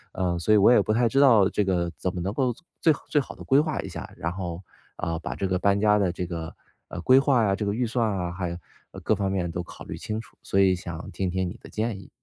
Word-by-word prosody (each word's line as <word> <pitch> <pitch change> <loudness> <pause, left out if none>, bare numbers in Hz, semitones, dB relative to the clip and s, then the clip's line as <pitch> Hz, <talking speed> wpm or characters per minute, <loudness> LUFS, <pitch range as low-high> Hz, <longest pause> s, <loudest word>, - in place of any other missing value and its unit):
呃， 90 -2 0
所 110 +5 +2
以 - - +7
我 105 +4 +6
也 120 - +6
不 110 - 0
太 120 +1 +3
知 135 - +2
道 115 -9 +6
这 105 - 0
个 85 -2 0
怎 95 - -2
么 90 - -3
能 95 +3 -2
够 125 -1 +1 0.3
最 160 - +4 0.2
最 150 - +3
好 135 - -5
地 - - -10
规 135 +2 +4
划 155 -1 -1
一 95 - -7
下。 - - -7
然 85 - -2
后， 90 -1 -5 0.3
呃， 85 -1 -2
把 - - -5
这 95 - -2
个 90 -1 0
搬 100 +1 +3
家 105 0 +4
的 95 -3 +2
这 90 - -3
个， 85 -2 -6 0.3
呃， 85 - -6
规 130 +7 +6
划 135 -4 +3
呀， 100 -2 +2
这 105 - -3
个 100 - 0
预 120 +2 0
算 115 0 0
啊， 90 -1 -2
还 90 0 -3
有 85 - -5 0.5
各 - - +2
方 95 -1 -1
面 90 -3 -1
都 90 - -3
考 - - -11
虑 - - -7
清 110 +1 -4
楚， 105 - -20
所 100 - 0
以 95 -1 +5
想 85 -2 -7
听 95 -2 -2
听 95 0 -1
你 - - -9
的 - - -12
建 110 -2 -2
议。 95 - -14
95 Hz, 305 characters per minute, -26 LUFS, 90-115 Hz, 0.5 s, 以